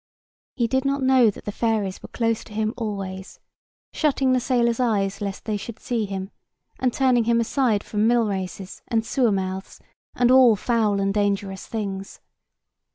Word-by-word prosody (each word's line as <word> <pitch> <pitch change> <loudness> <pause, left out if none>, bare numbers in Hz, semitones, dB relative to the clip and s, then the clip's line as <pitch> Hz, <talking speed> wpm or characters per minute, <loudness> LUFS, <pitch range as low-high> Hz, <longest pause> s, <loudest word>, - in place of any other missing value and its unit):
He 240 - +1
did 260 +3 0
not 275 0 0
know 260 -3 +5
that 205 - -8
the 205 - -3
fairies 210 -4 -1
were - - -10
close 230 -2 -1
to 210 - -13
him 215 +1 -1
always, 195 -4 -5 0.5
shutting 275 -4 +2
the 255 - +3
sailors' 235 -2 +1
eyes 200 -5 0
lest 200 -1 -5
they 215 -2 -1
should 225 +2 -8
see 230 -3 -2
him, 195 0 -5 0.5
and 255 -1 +1
turning 250 -3 +2
him 235 0 +3
aside 230 -3 +1
from 210 +1 0
millraces, 200 -5 -1
and 225 -1 0
sewer 240 -1 +2
mouths, 190 -1 -3 0.4
and 245 0 +3
all 255 -4 +7
foul 215 -2 +1
and 195 0 0
dangerous 200 -2 -1
things. 195 -3 -5
220 Hz, 165 wpm, -23 LUFS, 200-240 Hz, 0.5 s, all